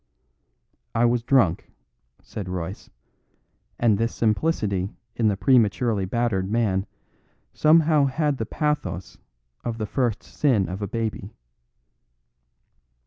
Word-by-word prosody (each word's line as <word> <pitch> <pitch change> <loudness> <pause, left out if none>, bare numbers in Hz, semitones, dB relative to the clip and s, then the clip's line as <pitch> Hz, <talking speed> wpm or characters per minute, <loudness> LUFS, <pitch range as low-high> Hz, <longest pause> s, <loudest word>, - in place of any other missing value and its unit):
"I 115 +1 +4
was 120 0 +2
drunk," 115 -9 +2 0.5
said 100 -3 -7
Royce; 90 +2 -5 0.9
and 110 -4 +2
this 115 +1 -1
simplicity 105 - 0 0.2
in 115 - +2
the 100 -2 +1
prematurely 110 -1 +2
battered 100 -2 -1
man 100 -4 0 0.7
somehow 155 -2 +4
had 145 0 0
the 110 - -2
pathos 95 - -3 0.4
of 115 -1 -3
the 110 - -2
first 120 -1 -1
sin 120 -10 +1
of 95 +3 -5
a 100 - -2
baby. 110 -1 -4
115 Hz, 110 wpm, -24 LUFS, 95-125 Hz, 0.9 s, I